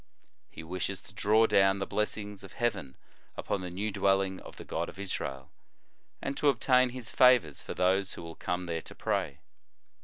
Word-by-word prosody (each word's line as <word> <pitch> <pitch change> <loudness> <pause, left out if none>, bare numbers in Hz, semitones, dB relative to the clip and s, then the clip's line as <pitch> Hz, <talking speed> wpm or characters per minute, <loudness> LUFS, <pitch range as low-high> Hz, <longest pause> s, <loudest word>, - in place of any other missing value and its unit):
He - - -10
wishes 95 +3 -3
to 100 - -15
draw 110 +2 +4
down 95 -2 +4
the 95 - -2
blessings 105 -1 -2
of 95 - -11
heaven 110 - -2 0.4
upon 100 - -2
the 90 - -5
new 100 +4 -3
dwelling 95 -1 +1
of - - -12
the - - -8
God 85 +1 -2
of - - -12
Israel, 70 -9 -5 0.7
and 135 - -2
to 150 - +4
obtain 130 -2 +4
His 125 -2 -7
favors 125 - +5
for - - -7
those 95 +1 +2
who - - -8
will 85 0 -7
come 90 +2 -3
there 85 -1 -3
to - - -13
pray. 85 -9 -1
95 Hz, 185 wpm, -30 LUFS, 90-105 Hz, 0.7 s, favors